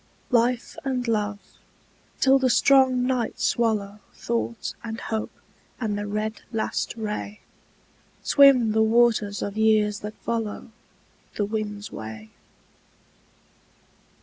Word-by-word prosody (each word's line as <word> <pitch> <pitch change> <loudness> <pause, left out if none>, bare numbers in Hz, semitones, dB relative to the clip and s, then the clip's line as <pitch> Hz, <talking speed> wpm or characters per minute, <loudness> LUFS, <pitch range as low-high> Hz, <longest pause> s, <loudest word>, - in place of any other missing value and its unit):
Life 240 0 +1
and 255 -3 -2
love, 210 -2 0 0.8
till 270 0 +5
the 260 -1 +2
strong 260 -1 +4
night 250 -3 -1
swallow 215 -3 0 0.2
Thought 235 0 -3
and 225 0 -5
hope 220 -1 -3 0.5
and 215 -4 -1
the 205 0 -4
red 215 +1 -3
last 225 0 -2
ray, 210 -1 -5 0.8
Swim 270 -6 +6
the 220 +1 +2
waters 220 -2 +2
of 200 +1 -5
years 215 -1 +3
that 210 +1 -7
follow 225 0 -4 0.6
The 205 - 0
wind's 210 -1 -4
way. 110 0 -8
220 Hz, 110 wpm, -24 LUFS, 210-240 Hz, 0.8 s, Swim